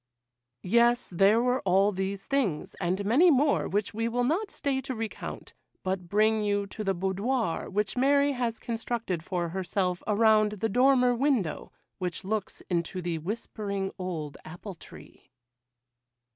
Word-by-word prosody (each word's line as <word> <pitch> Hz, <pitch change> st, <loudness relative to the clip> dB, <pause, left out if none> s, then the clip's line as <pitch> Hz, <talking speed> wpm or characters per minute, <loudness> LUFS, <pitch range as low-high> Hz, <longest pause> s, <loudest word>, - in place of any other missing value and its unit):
Yes, 235 Hz, +4 st, +3 dB
there 195 Hz, +5 st, +4 dB
were 250 Hz, +1 st, +1 dB
all 195 Hz, +2 st, +3 dB
these 195 Hz, 0 st, -3 dB
things, 240 Hz, -, -1 dB
and 185 Hz, +3 st, -1 dB
many 275 Hz, -, +5 dB
more 285 Hz, -1 st, +3 dB
which 205 Hz, +1 st, -1 dB
we 225 Hz, +2 st, -1 dB
will 245 Hz, +1 st, 0 dB
not 350 Hz, -, 0 dB
stay 275 Hz, -7 st, -1 dB
to 265 Hz, -1 st, -5 dB
recount, 225 Hz, -1 st, -6 dB, 0.3 s
but 185 Hz, -2 st, -3 dB
bring 215 Hz, +2 st, +3 dB
you 205 Hz, -1 st, 0 dB
to 215 Hz, +2 st, -7 dB
the 195 Hz, -1 st, 0 dB
boudoir 195 Hz, +3 st, -1 dB
which 205 Hz, 0 st, -1 dB
Mary 280 Hz, +2 st, +3 dB
has 240 Hz, -4 st, -2 dB
constructed 230 Hz, -6 st, -3 dB
for 175 Hz, -1 st, -2 dB
herself 180 Hz, 0 st, -1 dB
around 215 Hz, 0 st, +4 dB
the 215 Hz, +2 st, -2 dB
dormer 250 Hz, +2 st, +4 dB
window 240 Hz, -, 0 dB, 0.3 s
which 180 Hz, 0 st, -3 dB
looks 210 Hz, 0 st, -3 dB
into 175 Hz, +1 st, -1 dB
the 170 Hz, -2 st, -2 dB
whispering 200 Hz, +1 st, -4 dB
old 160 Hz, -6 st, -5 dB
apple 175 Hz, +5 st, -8 dB
tree. 170 Hz, -, -15 dB
210 Hz, 145 wpm, -28 LUFS, 185-245 Hz, 0.3 s, many